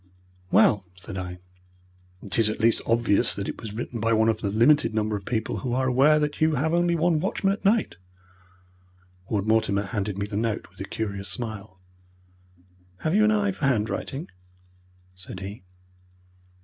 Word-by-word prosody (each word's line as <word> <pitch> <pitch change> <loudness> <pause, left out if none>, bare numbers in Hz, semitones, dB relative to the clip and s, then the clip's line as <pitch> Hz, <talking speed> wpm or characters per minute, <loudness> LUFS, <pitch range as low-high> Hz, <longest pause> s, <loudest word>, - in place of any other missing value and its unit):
"Well," 100 +1 +4
said 95 +2 -9
I, 90 -1 -5 0.9
"it 100 +2 -2
is 110 -1 +4
at 110 - -4
least 115 +1 +3
obvious 115 -3 +2
that 100 - -4
it - - -6
was 110 - -6
written 115 +2 -5
by 115 +1 +1
one 110 0 +3
of 110 -1 -1
the 100 - -1
limited 115 +4 +3
number 110 -1 0
of 100 -2 -6
people 110 -2 -2
who 125 -3 -3
are 130 0 +1
aware 135 +4 +5
that 150 0 -2
you 155 0 +3
have 155 +5 0
only 175 0 +2
one 165 -1 +2
watchman 195 +2 0
at 205 - -8
night." 210 - +2 1.3
Ward 105 -2 0
Mortimer 110 -2 +2
handed 100 -1 -3
me 100 - -1
the 105 0 -6
note, 110 -1 -1
with - - -12
a - - -3
curious 100 -3 -4
smile. 110 -5 -6 1.2
"Have 155 - 0
you 215 +2 +4
an 215 - +4
eye 205 -2 +2
for 175 - -3
handwriting?" 135 - -2 0.8
said 90 0 -10
he. 100 +3 -7
115 Hz, 175 wpm, -25 LUFS, 105-150 Hz, 1.3 s, aware